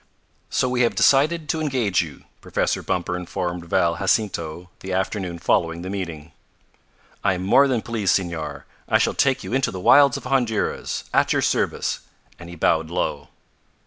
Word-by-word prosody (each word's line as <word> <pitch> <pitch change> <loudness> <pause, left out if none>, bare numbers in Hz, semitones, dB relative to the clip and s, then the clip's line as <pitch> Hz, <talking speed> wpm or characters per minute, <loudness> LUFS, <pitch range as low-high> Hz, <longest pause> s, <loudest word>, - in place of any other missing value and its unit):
"So 130 - +1
we 125 0 0
have 120 - +2
decided 155 +3 +3
to 160 - 0
engage 125 -11 +1
you," 80 -5 -9 0.2
Professor - - -1
Bumper 90 -1 -2
informed 90 -1 -4
Val 85 0 +1
Jacinto 90 -4 -1
the 95 - -7
afternoon 95 -1 -2
following 85 0 0
the 95 - -5
meeting. 85 -5 -6 0.9
"I 95 - +2
am 90 - -5
more 135 +9 +5
than 125 -5 0
pleased, 110 -6 +1
Senor. 80 -6 -4 0.2
I - - +5
shall - - +1
take 135 -2 +1
you - - -6
into 135 -1 +1
the 95 - -6
wilds 140 +8 +6
of - - -9
Honduras. 125 -5 -1
At - - +3
your - - +1
service!" - - 0 0.4
and 85 -1 -10
he 85 - -9
bowed 80 -1 +1
low. 90 +1 -2
95 Hz, 170 wpm, -22 LUFS, 85-125 Hz, 0.9 s, wilds